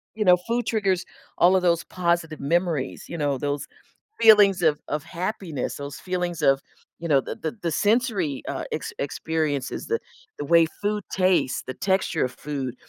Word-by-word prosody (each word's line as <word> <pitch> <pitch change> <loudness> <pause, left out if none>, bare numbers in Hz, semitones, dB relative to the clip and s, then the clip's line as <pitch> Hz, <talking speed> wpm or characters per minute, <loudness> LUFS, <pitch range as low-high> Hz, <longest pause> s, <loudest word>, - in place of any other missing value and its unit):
You 215 -1 -1
know, 180 -1 +8
food 235 +6 -2
triggers 195 -5 +1 0.3
all 180 +2 +5
of 185 - +3
those 170 -2 +2
positive 170 -3 -1
memories, 165 -2 -1
you 170 - -5
know, 145 -3 0
those 145 0 -3 0.5
feelings 205 -4 +7
of 155 -3 +3
of 150 0 -2
happiness, 175 - -4
those 140 0 -7
feelings 180 -2 -3
of, 135 0 +4 0.4
you 170 - -4
know, 145 -4 +4
the - - -6
the 160 - -4
the 170 -2 -1
sensory, 205 - +1
uh, - - -3
ex - - -4
experiences 150 -1 -2
that 455 +1 -1 0.4
the 145 - -4
way 170 +1 +5 0.2
food 205 0 -1
tastes, 185 -9 +2
the 130 - -3
texture 190 +4 0
of 125 - -4
food, 135 -4 -5
170 Hz, 170 wpm, -24 LUFS, 145-190 Hz, 0.5 s, know